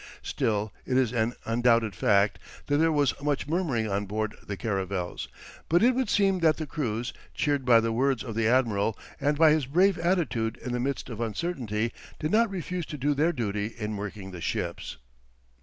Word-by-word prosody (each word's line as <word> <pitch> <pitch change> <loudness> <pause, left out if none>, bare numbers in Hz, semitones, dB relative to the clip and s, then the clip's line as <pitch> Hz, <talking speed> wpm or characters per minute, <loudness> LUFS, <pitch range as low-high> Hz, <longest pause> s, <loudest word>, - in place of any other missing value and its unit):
Still, 105 -1 -1
it 130 - 0
is 125 -3 +2
an 120 0 0
undoubted 115 -2 +2
fact 100 +3 +2 0.3
that 145 - +1
there 165 +1 +3
was 145 -4 +2
much 145 -1 0
murmuring 150 -9 0
on 100 0 -1
board 110 +1 -2
the 100 - -5
caravels, 95 -3 -3 0.4
but 175 +5 +4
it 250 +2 +5
would 255 -3 0
seem 195 -3 +3
that 160 -2 +3
the 155 - -3
crews, 120 -6 -3 0.2
cheered 145 -3 0
by 120 -2 +7
the 115 0 0
words 130 +1 +1
of 115 - -5
the 110 0 +1
admiral, 115 -4 +2 0.2
and 145 +1 +1
by 160 0 +6
his 150 -4 +1
brave 180 +5 +3
attitude 165 -11 0
in 125 - -6
the 125 - -1
midst 135 +2 -2
of 115 0 -5
uncertainty, 115 - -2 0.2
did 155 +1 -2
not 230 +1 +4
refuse 180 -2 -4
to 150 - -6
do 145 +2 +1
their 155 +4 +2
duty 110 -5 -3
in 105 -2 -3
working 100 -1 -6
the 90 -2 -8
ships. - - -3
125 Hz, 190 wpm, -27 LUFS, 110-155 Hz, 0.4 s, by